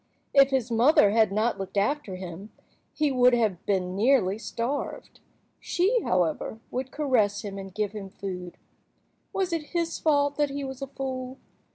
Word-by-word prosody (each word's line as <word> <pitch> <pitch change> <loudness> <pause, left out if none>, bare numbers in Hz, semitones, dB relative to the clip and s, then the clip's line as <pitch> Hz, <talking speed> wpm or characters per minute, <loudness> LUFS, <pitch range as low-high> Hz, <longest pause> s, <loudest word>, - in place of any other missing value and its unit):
If 275 -1 +7
his 255 -3 0
mother 230 -2 +5
had 220 -1 +3
not 215 +3 0
looked 195 +1 -5
after 210 -1 0
him 185 +3 -8 0.4
he 300 -2 0
would 250 -1 +5
have 210 -7 0
been 185 -2 0
nearly 215 -3 +3
starved. 240 +5 -4 0.4
She, 410 +7 +1
however, 180 +4 0
would 255 +1 -3
caress 230 -10 +1
him 200 -1 -6
and 195 0 -8
give 210 +1 -2
him 205 -2 -7
food. 180 -2 -7 0.7
Was 380 -2 -1
it 320 -1 -4
his 335 -1 -1
fault 285 -2 +2
that 295 -1 +2
he 280 0 -4
was 265 0 -6
a 275 - -3
fool? 260 -1 -5
235 Hz, 165 wpm, -27 LUFS, 195-280 Hz, 0.7 s, If